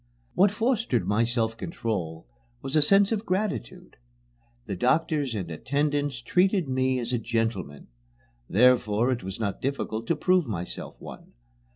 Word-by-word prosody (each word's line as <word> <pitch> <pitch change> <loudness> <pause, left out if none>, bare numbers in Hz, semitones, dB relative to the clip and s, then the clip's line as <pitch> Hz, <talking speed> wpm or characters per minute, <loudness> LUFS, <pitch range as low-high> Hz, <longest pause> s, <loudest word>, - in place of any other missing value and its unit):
What 200 +2 +5
fostered 215 - 0
my 105 +3 +2
self 115 -1 0
control 95 - -4 0.4
was 135 - -3
a 155 - +5
sense 195 +6 +5
of 220 -2 -1
gratitude. 190 - -3 0.7
The 100 - -4
doctors 140 - +1
and 90 -5 -4
attendants 145 - -1
treated 185 - +2
me 130 0 +1
as 120 0 -3
a 120 - +1
gentleman. 110 -10 -2 0.6
Therefore 120 +1 +3
it 125 - -2
was 95 +2 -6
not 100 -3 -3
difficult 115 -4 -3
to 170 - +2
prove 180 -5 +2
myself 90 -5 -5
one. - - -11
125 Hz, 145 wpm, -26 LUFS, 110-160 Hz, 0.7 s, What